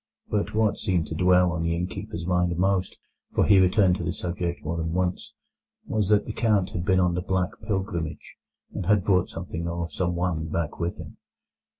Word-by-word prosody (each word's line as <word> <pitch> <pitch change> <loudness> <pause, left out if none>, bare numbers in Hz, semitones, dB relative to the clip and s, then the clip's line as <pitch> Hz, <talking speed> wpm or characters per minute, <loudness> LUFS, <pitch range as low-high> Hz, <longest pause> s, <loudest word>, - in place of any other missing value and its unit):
But 105 0 -1
what 110 -2 +2
seemed 90 -4 +1
to - - -4
dwell 90 +1 +4
on 85 -1 -2
the 85 0 0
innkeeper's 85 -1 -4
mind 90 -1 +1
most—for 95 0 -1
he 100 -2 +6
returned 95 0 +4
to 90 - -4
the 80 - -1
subject 85 -1 -3
more 85 +2 -2
than 80 0 -2
once—was 95 +3 -4
that 105 -1 +4
the 110 - -5
Count 105 -5 +1
had 85 - -3
been 95 0 +3
on 90 -1 +3
the 90 - -1
Black 95 0 0 0.2
Pilgrimage, 95 -6 -3 0.4
and 90 - -4
had 105 -2 +4
brought 95 -2 +2
something 85 -1 -5
or 85 0 -3
someone 85 -2 -1
back 80 0 -3
with 85 0 -1
him. - - -10
90 Hz, 185 wpm, -26 LUFS, 85-95 Hz, 0.4 s, he